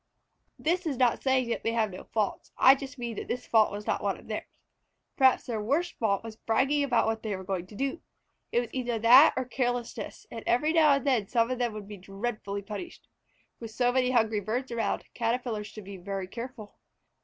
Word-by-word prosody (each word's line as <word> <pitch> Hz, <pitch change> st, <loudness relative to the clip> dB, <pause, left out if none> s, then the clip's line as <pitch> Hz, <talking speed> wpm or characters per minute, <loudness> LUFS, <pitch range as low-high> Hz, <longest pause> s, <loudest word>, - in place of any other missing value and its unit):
This 345 Hz, +2 st, 0 dB
is 280 Hz, -5 st, -2 dB
not 245 Hz, -2 st, +2 dB
saying 260 Hz, -2 st, +2 dB
that -, -, -1 dB
they 225 Hz, -, -1 dB
have 220 Hz, -3 st, +1 dB
no 185 Hz, -, -9 dB
faults. 215 Hz, -3 st, -2 dB
It 265 Hz, +1 st, +7 dB
just 275 Hz, 0 st, -8 dB
means 235 Hz, -3 st, -4 dB
that -, -, -7 dB
this 250 Hz, +1 st, -3 dB
fault 220 Hz, -2 st, +4 dB
was 205 Hz, +1 st, -6 dB
not -, -, 0 dB
one -, -, -1 dB
of -, -, -16 dB
theirs. -, -, -6 dB, 0.6 s
Perhaps 265 Hz, -2 st, +4 dB
their 225 Hz, -3 st, -3 dB
worst 290 Hz, +11 st, 0 dB
fault 200 Hz, -3 st, +1 dB
was 225 Hz, -1 st, -8 dB
bragging 270 Hz, +7 st, +1 dB
about 245 Hz, -4 st, +2 dB
what 225 Hz, 0 st, -1 dB
they 215 Hz, -3 st, -3 dB
were 190 Hz, -, -7 dB
going 185 Hz, -2 st, -3 dB
to 210 Hz, -, -13 dB
do. 275 Hz, +7 st, -2 dB, 0.5 s
It 240 Hz, -, +3 dB
was 240 Hz, -, -6 dB
either 245 Hz, -3 st, -1 dB
that 245 Hz, +7 st, +7 dB
or 260 Hz, -, 0 dB
carelessness, 245 Hz, -3 st, -3 dB
and 230 Hz, -1 st, -7 dB
every 300 Hz, +7 st, +2 dB
now 310 Hz, -3 st, +6 dB
and 275 Hz, 0 st, 0 dB
then 245 Hz, -8 st, +2 dB
some 230 Hz, 0 st, +2 dB
one -, -, -3 dB
of 255 Hz, -, -2 dB
them 240 Hz, -3 st, 0 dB
would 210 Hz, -2 st, -8 dB
be 205 Hz, -1 st, -8 dB
dreadfully 200 Hz, +1 st, -4 dB
punished. 215 Hz, -, -8 dB, 0.5 s
With 230 Hz, -, -7 dB
so 245 Hz, +2 st, +1 dB
many 255 Hz, 0 st, +2 dB
hungry 225 Hz, -4 st, +2 dB
birds 240 Hz, +6 st, -3 dB
around, 235 Hz, -1 st, -1 dB
Caterpillars 230 Hz, -2 st, -2 dB
should 215 Hz, -, -10 dB
be 195 Hz, 0 st, -9 dB
very 195 Hz, +1 st, -4 dB
careful. 230 Hz, 0 st, -8 dB
235 Hz, 220 wpm, -28 LUFS, 215-260 Hz, 0.6 s, It